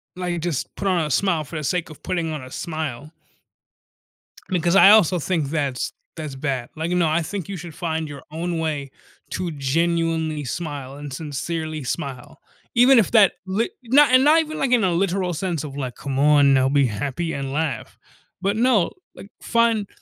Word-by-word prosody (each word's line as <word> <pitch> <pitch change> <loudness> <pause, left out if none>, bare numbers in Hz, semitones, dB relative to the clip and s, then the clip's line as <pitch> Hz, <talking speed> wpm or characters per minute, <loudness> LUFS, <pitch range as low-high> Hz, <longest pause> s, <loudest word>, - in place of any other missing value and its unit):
like, 180 -2 -3
just 165 -5 -3
put 200 - -3
on 175 -4 +2
a 150 - -4
smile 170 +2 +1
for 155 +2 -7
the 150 - -4
sake 165 +3 -1
of 150 - -13
putting 170 -3 -2
on 150 - -5
a 130 - -10
smile 155 -2 -5 1.4
because 175 -1 +1
I 195 - +9
also 185 -5 +5
think 160 -2 -1
that's 140 -5 -2 0.2
that's 150 -4 -6
bad. 130 -3 -3
Like, 160 +2 -3
no, 180 -2 +2
I 160 +2 +1
think 190 +2 -5
you 200 - -5
should 170 -2 -8
find 160 -2 -3
your 145 -1 -9
own 165 +1 -3
way 150 -4 -3 0.4
to 180 -2 -2
genuinely 160 +1 0
smile 140 -2 -5
and 145 -1 -8
sincerely 155 0 -4
smile, 140 +4 -5 0.4
even 245 +1 +7
if 205 - +1
that 215 -5 +6
li 205 - -1
no 265 +5 +6
and 255 +1 +6
not 310 +2 +6
even 310 0 -6
like 270 -2 0
in 240 -4 +4
a 185 - +2
literal 180 0 0
sense 170 -2 -2
of 140 -2 -7
like, 130 -4 -4
"Come 135 -1 -4
on 145 -1 +5
now 130 -1 +4
be 140 -1 +3
happy 140 +10 -3
and 135 -1 -4
laugh," 150 -6 -3 0.4
but 200 +3 0
no, 235 -6 +3 0.2
like 200 - -12
find 230 -3 +2
160 Hz, 190 wpm, -22 LUFS, 145-185 Hz, 1.4 s, I